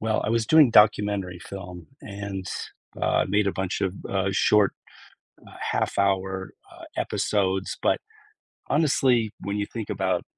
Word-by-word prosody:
Well, 110 0 0
I - - 0
was 115 -1 +1
doing 155 -5 +6
documentary 105 -4 +3
film 90 -3 -9 0.2
and, 100 -2 -6 0.5
uh, - - +2
made 100 +1 +2
a 100 - +1
bunch 95 0 -3
of, 95 -2 -1
uh, 95 0 0
short, 105 +1 +4 0.8
uh, - - -14 0.2
half-hour, 95 -1 0 0.2
uh, - - -14
episodes. 95 -2 -1
But - - +2 0.7
honestly, 130 -7 +2
when 100 +1 -3
you 100 - -1
think 115 -3 -5
about 95 -2 -1
100 Hz, 140 wpm, -25 LUFS, 95-105 Hz, 0.8 s, doing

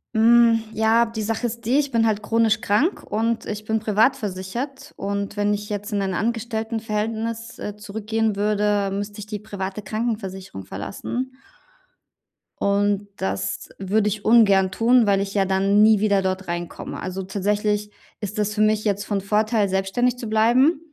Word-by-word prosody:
Hm, 230 0 +6
ja, 225 +2 +3
die 225 -1 -5
Sache 225 +3 -1
ist 235 +1 -7
die, 245 +5 +2
ich 285 -2 -1
bin 230 -2 +2
halt 215 -1 +1
chronisch 225 0 +2
krank 245 - +1
und 225 +2 -1
ich 210 0 -5
bin 220 +1 0
privat 220 +5 +3
versichert. 240 +7 -5
Und 200 +1 -3
wenn 205 0 +2
ich 205 0 -4
jetzt 205 0 -4
in 200 - +1
ein 190 -1 -1
Angestelltenverhältnis, 225 +1 -2
äh, 210 0 -5
zurückgehen 220 +1 -2
würde, 205 -1 +1
müsste 205 +1 -4
ich 205 - -6
die 210 -1 -5
private 200 -1 -5
Krankenversicherung 195 - -4
verlassen. 250 - -5 1.2
Und 205 0 +1
das 95 0 -3
würde 205 +2 +1
ich 210 0 -2
ungern 200 -5 +5
tun, 230 +2 +4
weil 200 -1 +3
ich 195 0 -3
ja 195 -2 +2
dann 195 +2 +3
nie 215 -1 +6
wieder 200 -2 +2
dort 190 0 -2
reinkomme. 175 0 -5
Also, 185 +1 -4
tatsächlich 210 +2 -1 0.3
ist 210 +1 -5
das 210 0 0
für 215 - -1
mich 215 0 +3
jetzt 205 -1 0
von 205 0 -1
Vorteil, 210 +2 +1
selbstständig 195 +6 0
zu 235 -2 -6
bleiben. 245 +8 +3
210 Hz, 165 wpm, -23 LUFS, 200-225 Hz, 1.2 s, Hm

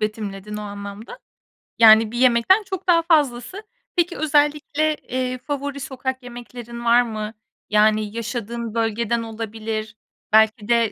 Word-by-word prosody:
betimledin 210 -1 -4
o - - -5
anlamda. 205 - -8 0.6
Yani, 220 -1 +7
bir 240 - -5
yemekten 255 - +4
çok 380 -1 -6
daha 335 -1 +5
fazlası. 300 - 0 0.3
Peki, 350 0 0
özellikle, 300 0 +1
eee, 255 -2 -3
favori 285 +1 -4
sokak 260 -1 -4
yemeklerin 240 -1 -9
var 235 +1 +6
mı? 215 -2 -4 0.4
Yani, 215 0 +2
yaşadığın 230 0 -4
bölgeden 230 0 0
olabilir, 220 -1 -5 0.4
belki 220 0 +4
de 235 -2 +2
235 Hz, 125 wpm, -22 LUFS, 215-270 Hz, 0.6 s, Yani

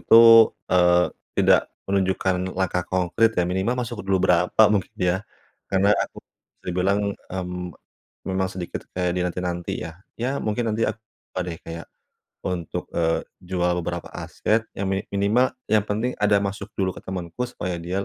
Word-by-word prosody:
itu, 115 -1 +8 0.2
eee, 90 -1 +4 0.3
tidak - - +4 0.2
menunjukkan 95 -1 +1 0.2
langkah 90 -1 0
konkrit, 95 +5 +2
ya. 90 - +4
Minimal 95 +7 0
masuk 120 -2 -3
dulu 95 -1 +1
berapa, 90 +5 +4
mungkin 100 -3 0
ya. 90 0 +1 0.5
Karena 100 +2 +4
aku, - - -3 0.4
bisa - - -44
dibilang, 95 +3 +2 0.3
mmm, 90 -1 -4 0.6
memang 95 0 0
sedikit 90 -2 -5 0.2
kayak 90 -1 +1
dinanti-nanti, 90 -1 -2
ya. 80 - -6 0.3
Ya, 130 +4 -1
mungkin 110 +1 -1
nanti 115 +1 -1
ak 110 - -3 0.4
ba 90 - 0
deh, 85 -2 -4
kayak, 85 0 -7 0.6
untuk, 90 -3 -3
eee, 80 -1 +1 0.2
jual 90 -1 0
beberapa 85 +1 -4
aset 110 +1 0 0.2
yang 100 - -1
mini 95 0 0
minimal, 105 +6 +3 0.2
yang 110 -2 +4
penting 110 +5 -1
ada 105 -1 +5
masuk 100 0 -4
dulu 95 -1 +1
ke - - -10
temanku, 90 +2 -5
supaya 90 -6 -4
dia 95 +3 -2
95 Hz, 155 wpm, -24 LUFS, 90-105 Hz, 0.6 s, itu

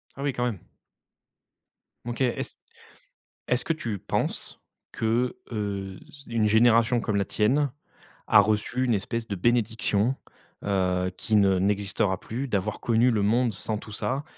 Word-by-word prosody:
Ah 140 - -8
oui, 145 - +1
quand 120 -1 -3
même. 115 -6 -2 1.5
OK, 120 0 -4
est-ce 125 -2 -1 0.9
est-ce 125 - +2
que 165 - +1
tu 115 -10 -4
penses - - -2 0.3
que, 115 +3 0 0.2
heu, 100 -3 -4 0.3
une 115 -2 +1
génération 115 +2 +4
comme 105 -2 -1
la 100 - +1
tienne 135 +10 +2 0.6
a 105 - +7
reçu 110 +4 0
une 125 -2 +2
espèce 115 +3 -2
de 100 - -3
bénédiction, 115 +2 +1 0.5
heu, 90 -2 +1
qui 110 - 0
ne 95 -2 +4
n'existera 100 0 0
plus, 125 +5 -4
d'avoir 105 -1 -1
connu 120 +1 +3
le 110 -4 +1
monde 115 +3 +2
sans 105 +2 -2
tout 110 - -11
ça, 135 +6 -2
110 Hz, 145 wpm, -26 LUFS, 100-120 Hz, 1.5 s, a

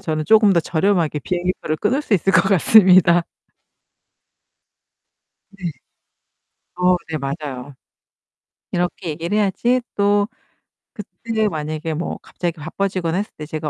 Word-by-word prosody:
저는 155 -5 -3
조금 215 +1 +5
더 170 - +4
저렴하게 165 -1 0
비행기표를 175 -1 -2
끊을 245 - 0
수 235 -8 0
있을 195 +1 +1
것 165 - +6
같습니다." 185 -3 +5 2.3
네. 190 -4 -5 1.1
어 180 0 +3
네, 155 - -2
맞아요. 140 -1 -6 1.0
이렇게 175 -1 -2
얘기를 170 +6 -3
해야지 215 +5 +1
또 205 0 +2 0.7
그때 220 +1 -3
만약에 155 -2 -4
뭐 165 +3 -4
갑자기 170 -1 -5
바빠지거나 175 +1 -2
했을 205 +2 -3
때 150 - -7
제가 155 0 -4
180 Hz, 260 characters per minute, -20 LUFS, 155-200 Hz, 2.3 s, 것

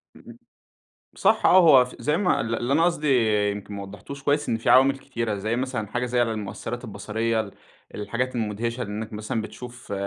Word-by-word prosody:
امم، - - -14 0.8
صح - - +3
آه، - - +7
هو 140 -8 +7
ف 125 - -12
زي 150 +3 +1
ما 190 -3 +1
ال 115 +1 -2
اللي 120 +4 -1
أنا 165 +3 +4
قصدي 155 -4 0 0.4
يمكن 100 0 -7
ما 100 0 -5
وضحتوش 105 +9 -10
كويس، 145 +1 +1
إن 115 - +1
في 115 - -2
عوامل 135 +1 +6
كتيرة 115 -6 -3
زي 110 +4 -2
مثلًا 125 -4 -3
حاجة 125 +4 -2
زي 125 0 +1
المؤثرات 115 +2 -4
البصرية، 110 +1 -2
ال 100 -3 -9 0.4
الحاجات 120 +5 -3
المدهشة 115 +2 -2
إنك 110 +1 -6
مثلًا 110 +1 -3
بتشوف 120 0 -9
115 Hz, 185 wpm, -24 LUFS, 105-130 Hz, 0.8 s, آه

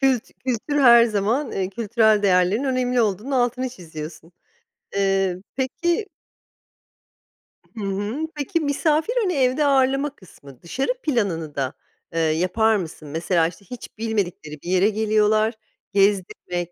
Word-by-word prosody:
Kült 265 -4 +2 0.2
kültür 265 +4 0
her 235 -2 +8
zaman, 225 +6 0
eee, 190 -1 -1
kültürel 220 0 +2
değerlerin 190 +5 +3
önemli 250 -2 +1
olduğunun 215 +4 -2
altını 255 0 +1
çiziyorsun. 165 -5 -9 0.6
Eee, 195 -2 +1
peki 340 - -1 1.7
Hı 215 - -4
hı. 205 +10 -2
Peki, 295 +3 -1
misafir 310 +6 +1
hani, 375 -4 0
evde 270 +1 +2
ağırlama 275 +1 +2
kısmı. 140 -8 -16
Dışarı 265 - -1
planını 185 - -1
da, 135 -1 -2 0.4
eee, 165 - -1
yapar 180 +8 +2
mısın? 165 -5 -5
Mesela, 165 +2 +1
işte, 180 +4 -11
hiç 245 0 -10
bilmedikleri 195 -9 -3
bir 175 - -6
yere 185 +3 +4
geliyorlar, 215 +1 +2 0.4
gezdirmek, 190 -3 0
215 Hz, 125 wpm, -22 LUFS, 180-260 Hz, 1.7 s, her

